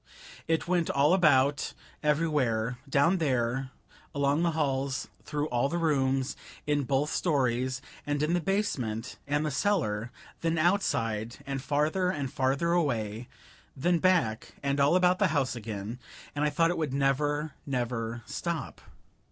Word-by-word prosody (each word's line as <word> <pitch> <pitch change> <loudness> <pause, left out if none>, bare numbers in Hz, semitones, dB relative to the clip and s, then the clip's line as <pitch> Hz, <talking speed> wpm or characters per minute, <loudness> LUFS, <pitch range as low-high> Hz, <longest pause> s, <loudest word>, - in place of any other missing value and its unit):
It 160 0 0
went 175 -2 +1
all 145 +4 +4
about, 145 -5 +3 0.3
everywhere, 135 -7 +1
down 150 +7 +3
there: 130 -3 0 0.5
along 140 +2 +2
the 170 -1 +1
halls, 135 -2 0 0.2
through 150 0 -2
all 125 +3 +1
the 170 - -1
rooms, 135 -5 +1 0.3
in 145 -2 +1
both 140 +4 +1
stories, 130 -4 0 0.2
and 145 0 -1
in 155 +3 +1
the 175 - +2
basement 130 - -1
and 145 +2 +1
the 150 - -1
cellar; 125 - 0 0.3
then 165 0 0
outside, 120 - +1
and 135 -1 -3
farther 150 +6 +1
and 145 -7 -3
farther 140 +6 +1
away 120 -9 0 0.5
then 175 +5 +2
back, 155 -12 +1
and 140 0 0
all 140 +5 +4
about 180 0 +4
the 205 - +4
house 130 -3 0
again, 110 0 -5 0.3
and 145 - -1
I 150 - +3
thought 165 +3 +2
it 175 - -2
would 145 -4 -1
never, 145 +2 +1
never 120 -3 -2
stop. 170 +5 -4
140 Hz, 145 wpm, -29 LUFS, 125-165 Hz, 0.5 s, all